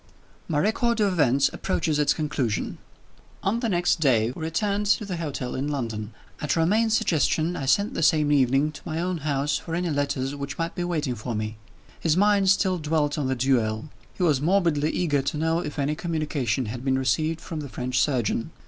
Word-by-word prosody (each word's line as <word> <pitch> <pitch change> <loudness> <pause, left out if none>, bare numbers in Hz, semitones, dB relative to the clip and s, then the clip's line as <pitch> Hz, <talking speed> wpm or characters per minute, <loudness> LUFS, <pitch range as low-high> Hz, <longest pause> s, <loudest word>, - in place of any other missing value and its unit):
IX. - - -31
MY 150 -3 +1
record 230 +3 +1
of 200 -3 +2
events 140 -4 +3
approaches 155 -5 -1
its 145 -1 +3
conclusion. 140 - -2 0.6
On 210 +4 +1
the 235 -2 -1
next 175 -2 +2
day 120 -6 +3
we 130 - -9
returned 200 +6 -1
to 210 +1 +2
the 185 -3 -4
hotel 145 -6 -4
in 135 +2 -2
London. 115 -7 -3 0.3
At 150 - 0
Romayne's 215 +7 +3
suggestion, 165 -3 +1
I 135 - -4
sent 200 +9 +2
the - - -2
same 150 -2 +3
evening 135 +1 +3
to 150 - -11
my 160 -2 -3
own 180 0 -1
house 145 -1 0
for 165 - -5
any 175 -1 -1
letters 140 -2 -1
which 140 -2 -5
might 165 0 -2
be 175 - -3
waiting 155 -7 -1
for 120 0 -5
me. 110 +1 -3 0.4
His 160 0 +1
mind 200 -1 +4
still 190 -1 +3
dwelt 150 -1 0
on 140 - -1
the 130 - 0
duel; 120 -1 0 0.3
he 185 - -2
was 150 -6 +3
morbidly 165 -3 +2
eager 150 -6 +1
to 140 - -3
know 160 +2 +1
if 150 -3 -5
any 145 +1 0
communication 155 -6 -1
had 120 +3 -6
been 135 -1 +1
received 155 +5 0
from 160 -1 -6
the 145 -2 -6
French 125 0 -2
surgeon. 120 -2 0
150 Hz, 200 wpm, -25 LUFS, 135-175 Hz, 0.6 s, mind